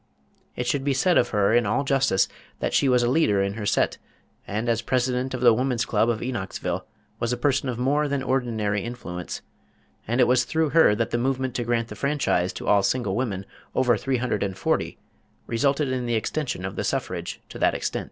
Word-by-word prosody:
It 125 - -2
should 135 +3 0
be 140 -1 +1
said 180 +6 +3
of 120 - +1
her 105 0 +2
in 120 -3 +3
all 140 +7 +1
justice 135 -8 +2 0.3
that - - -2
she 140 - +3
was 125 -1 +4
a - - +2
leader 125 -7 +3
in 100 0 -1
her 105 -1 -4
set, - - +1 0.5
and 110 +4 -2
as 115 -1 +1
President 130 +1 0
of 125 - -5
the 120 -2 +7
Woman's 125 0 0
Club 110 +1 +2
of 115 -2 -1
Enochsville 120 -7 -3 0.3
was 115 0 -1
a 125 - 0
person 135 +1 +1
of 120 - -3
more 145 +4 +1
than 140 -1 -1
ordinary 110 -6 0
influence, 90 -8 -6 0.6
and 120 +3 0
it - - +7
was 125 0 +4
through 160 +5 0
her 160 -10 +5
that 115 +1 -1
the 120 - 0
movement 130 0 -1
to 120 - -2
grant 115 -1 -1
the - - -7
franchise 140 -11 0
to - - -7
all 100 -1 +5
single 105 -2 0
women 105 -6 -2 0.3
over 125 -2 +3
three 130 +4 -1
hundred 125 +1 -1
and 95 -2 -2
forty, - - -1 0.5
resulted 140 +4 +1
in 125 -2 -2
the 120 - +1
extension 120 - -2
of 95 - -5
the - - -1
suffrage - - -3
to - - -9
that - - +3
extent. - - -2
120 Hz, 215 wpm, -25 LUFS, 110-130 Hz, 0.6 s, the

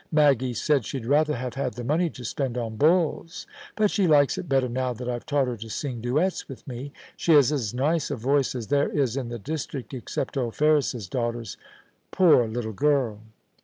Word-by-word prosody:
Maggie 135 -5 +3
said 145 +1 +1
she'd 125 +1 -5
rather 150 +4 +2
have 125 0 -4
had 135 -1 -3
the 120 - -6
money 160 +7 +1
to 125 -5 -10
spend 125 +1 -2
on 115 -2 -3
bulls; 165 - +1 0.3
but 215 -2 +2
she 195 -4 +2
likes 145 -3 +4
it 175 - -6
better 135 -2 +2
now 125 +1 -2
that 120 +1 -7
Fve 120 -1 -3
taught 145 -3 +1
her 120 -2 -3
to 110 +1 -8
sing 125 0 -4
duets 150 +11 0
with 135 - -10
me. 130 +2 -6 0.2
She 165 - +2
has 145 -2 +6
as 125 -9 -1
nice 150 +4 +1
a 145 - -2
voice 135 +3 +1
as 115 -4 -5
there 145 0 +2
is 135 -5 0
in 130 -4 -3
the 120 - -5
district, 140 +1 -5
except 130 +2 -4
old 120 -4 -2
Ferris's 145 -8 +2
daughter's 120 +1 -3 0.3
— - - -39
poor 165 -11 +5
little 110 0 -4
girl 135 -4 +1
135 Hz, 205 wpm, -25 LUFS, 120-150 Hz, 0.3 s, has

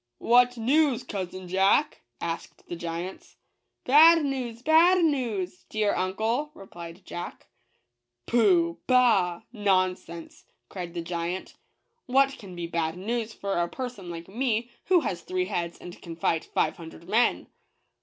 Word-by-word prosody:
"What 245 - +4
news, 260 +1 +2
cousin 185 -5 -6
Jack?' 195 +11 +2 0.2
asked 165 0 -6
the - - -5
giant. 170 +2 -6 0.2
" - - -53
Bad 320 +4 +7
news! 250 -4 -4
Bad 335 +4 +5
news! 225 - -2
— - - -43
dear 215 -1 +1
uncle," 220 +10 -1
re 195 - -11
plied 170 0 -11
Jack. 175 - -7 0.4
" 120 0 -56
Pooh! 175 -8 +3
— - - -51
bah! 220 -9 +3
— - - -49
nonsense," 185 -5 -1 0.2
cried 175 -2 -7
the 170 - -3
giant; 170 +2 -4 0.5
"what 270 +2 +3
can 190 -4 -10
be 175 -1 -4
bad 165 0 -2
news 225 +3 -3
for 200 -2 -4
a 170 - +1
person 245 -8 -6
like 170 0 -7
me, 235 +2 -1
who 360 -2 +4
has 175 - -3
three 185 +1 -2
heads 170 -3 -3
and 175 - -11
can 165 -1 -8
fight 165 -1 0
five - - 0
hun 165 -1 -9
dred 170 +1 -15
men?" 225 +5 +2
195 Hz, 160 wpm, -27 LUFS, 175-245 Hz, 0.5 s, Bad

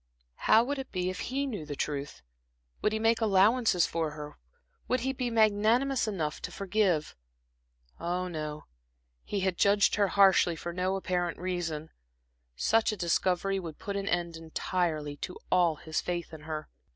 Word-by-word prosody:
How 225 +1 +7
would 280 +3 -2
it 265 - -7
be 185 -1 -1
if 185 - -7
he 275 +3 -2
knew 215 - -4
the 145 -1 -6
truth? 140 0 -4 0.6
Would 210 - +2
he 220 - 0
make 225 +1 +2
allowances 210 -1 +4
for 165 -2 -1
her, 150 -1 -8 0.5
would 255 0 +1
he 265 +2 -1
be 250 -2 -2
magnanimous 225 +4 +3
enough 165 -8 -2
to - - -5
forgive? 195 -6 0 0.8
Ah, 180 +2 -2
no, 155 -3 -5 0.6
he 200 - -2
had 185 -2 -1
judged 200 0 +4
her 205 -1 +3
harshly 190 -3 +5
for 170 +1 -6
no 185 +2 0
apparent 180 -2 -1
reason. 170 -4 -3 0.6
Such 220 - +2
a 215 - -4
discovery 185 +2 +1
would 165 -4 -7
put 200 - -5
an 200 0 -2
end 170 -3 -1
entirely 160 -2 -2
to 180 - -6
all 175 -3 +4
his 155 +1 -3
faith 175 -2 -4
in 155 - -9
her. 155 -1 -4
185 Hz, 165 wpm, -29 LUFS, 165-215 Hz, 0.8 s, How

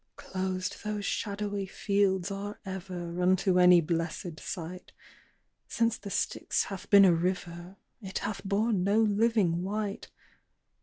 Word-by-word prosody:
"Closed 185 0 -4
those 210 -1 -3
shadowy 205 -1 -2
fields 195 -1 0
are 200 +1 -5
ever 180 -2 -5
Unto 185 0 +3
any 180 -1 +7
blessèd 165 0 -3
sight. 180 +2 -7 0.7
Since 230 -1 0
the 200 - -8
Styx - - 0
hath 195 -1 -8
been 200 -1 +8
a 180 - +6
river, 175 +1 -3 0.3
It 190 -2 -5
hath 205 0 -4
borne 200 0 +1
no 200 +3 +3
living 210 -5 +2
wight. 200 +1 -3
190 Hz, 130 wpm, -29 LUFS, 180-205 Hz, 0.7 s, been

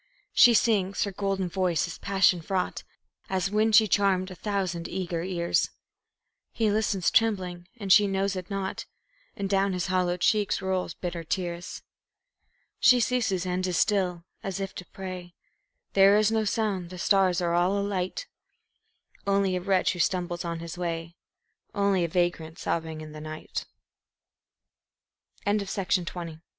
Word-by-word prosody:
She 240 -1 +7
sings 200 -4 +2
her 200 - -2
golden 195 -1 -1
voice 180 -2 0
is 170 - -8
passion 190 -3 +3
fraught, 185 +2 -2 0.5
As 190 0 -1
when 215 +1 +2
she 215 0 +6
charmed 195 -2 +2
a - - -5
thousand 185 -3 -2
eager 175 -3 -3
ears; 175 -1 0 0.8
He 220 -2 +1
listens 205 -4 +1
trembling, 185 -6 +1
and 200 -4 +3
she 205 -1 +6
knows 195 0 0
it 185 -1 -6
not, 195 -1 -4 0.5
And 200 - -3
down 195 0 +1
his 180 -2 -1
hollow 180 -1 +1
cheeks 205 +3 +2
roll 190 -1 -1
bitter 175 -2 -4
tears. 175 0 -4 1.0
She 250 -1 +6
ceases 225 -7 0
and 185 +1 -1
is 180 -2 -1
still, 180 -5 +1 0.2
as 195 -1 -4
if 195 -1 -4
to 180 - -9
pray; 185 -2 -8 0.6
There 195 +1 +6
is 215 0 +3
no 220 -1 +1
sound, 200 -5 -1
the 180 - -9
stars 190 -1 +3
are 170 -1 0
all 180 +3 +2
alight 200 - -2 1.0
Only 195 -1 +2
a 180 - -2
wretch 190 0 +2
who 175 - -8
stumbles 175 0 0
on 170 -1 -4
his 170 +1 -7
way, 170 -1 -3 0.6
Only 200 -3 +2
a - - +1
vagrant 165 -2 -1
sobbing 160 -1 -3
in 155 -1 -9
the 155 0 -9
night. 155 0 -6 1.8
The 195 -3 0
Rhyme 165 -2 -7
185 Hz, 150 wpm, -27 LUFS, 175-200 Hz, 1.8 s, She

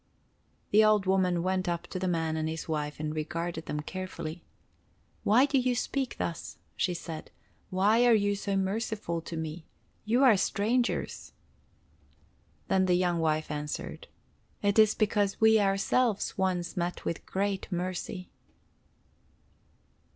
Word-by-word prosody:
The 215 +1 +6
old 215 -2 +4
woman 185 -2 +2
went 185 0 0
up 170 -1 -2
to 185 - -4
the 185 - -1
man 165 -2 0
and 160 0 -1
his 160 0 -5
wife 150 -2 -3
and 155 0 -2
regarded 165 +1 -3
them 150 - -2
carefully. 175 -1 -6 0.8
"Why 240 +6 +5
do 280 -1 +2
you 250 -1 +1
speak 265 +1 -2
thus?" 170 - -4 0.2
she 180 - 0
asked. 160 -2 -6 0.4
"Why 210 +6 +4
are 240 - +6
you 205 -1 +2
so 200 0 -2
merciful 195 -3 -2
to 165 0 -6
me? 160 +1 -5 0.4
You 235 +5 +2
are 250 -5 +7
strangers." 235 +6 -1 1.3
Then 190 0 +2
the 180 - +4
young 175 -1 +1
wife 155 -1 0
answered: 150 - -5 0.6
"It 205 +1 +3
is 215 -1 +6
because 205 -2 +1
we 220 0 +6
ourselves 200 +3 +1
once 180 -3 -1
met 175 0 -3
with 165 - -3
great 195 0 -2
mercy." 180 +1 -4
185 Hz, 140 wpm, -29 LUFS, 170-210 Hz, 1.3 s, are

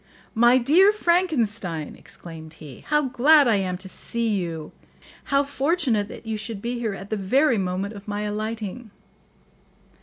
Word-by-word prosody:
"My 240 +2 +5
dear 320 +11 +5
Frankenstein," 235 - 0
exclaimed 160 -2 -10
he, 150 -5 -12
"how 300 0 +2
glad 275 +3 +5
I 225 -3 +4
am 185 -2 -2
to 190 +1 -10
see 230 +4 -3
you! 170 -6 -3 0.5
How 280 0 +2
fortunate 280 - 0
that 220 - -11
you 220 -1 -3
should 215 -1 -5
be 240 +3 -3
here 220 -4 -2
at 195 +2 -10
the 215 - 0
very 245 +5 +2
moment 190 +2 -2
of 200 0 -11
my 205 0 -3
alighting!" 215 +2 -4
220 Hz, 155 wpm, -24 LUFS, 195-265 Hz, 0.5 s, My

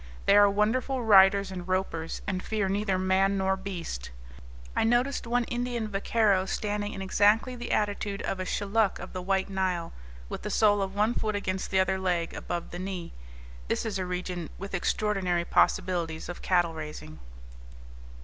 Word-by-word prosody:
They - - +5
are 205 0 +7
wonderful 240 +6 0
riders 200 -2 +6
and 180 -1 -6
ropers, 185 -3 -2
and 185 -2 -2
fear 210 -1 -1
neither 195 0 0
man 190 +1 +2
nor 190 0 +1
beast. 180 - -6 0.7
I - - +2
noticed 240 +3 +1
one 245 +1 +2
Indian 240 -1 -2
vaqueiro 200 -1 +1
standing 210 0 -2
in 195 - -5
exactly 210 +6 +3
the 240 0 -6
attitude 205 -1 -1
of 195 - -2
a - - -1
Shilluk 205 +1 +1
of - - -9
the 185 - -4
White 190 +1 0
Nile, 185 -3 -2 0.3
with - - -6
the 210 - -4
sole 205 0 +3
of 195 0 -3
one 210 +3 +2
foot 215 -3 -1
against 190 -2 -2
the 190 - +2
other 190 0 +1
leg, 175 -3 -1
above 175 -1 -5
the 175 - -6
knee. 185 -2 -5 0.5
This - - -1
is 205 -3 -2
a 185 - -1
region 180 -2 -4
with 195 +1 -7
extraordinary 185 -2 0
possibilities 170 -4 +1
of 175 - -6
cattle 175 -3 +2
raising. 150 - -8
195 Hz, 170 wpm, -28 LUFS, 185-210 Hz, 0.7 s, are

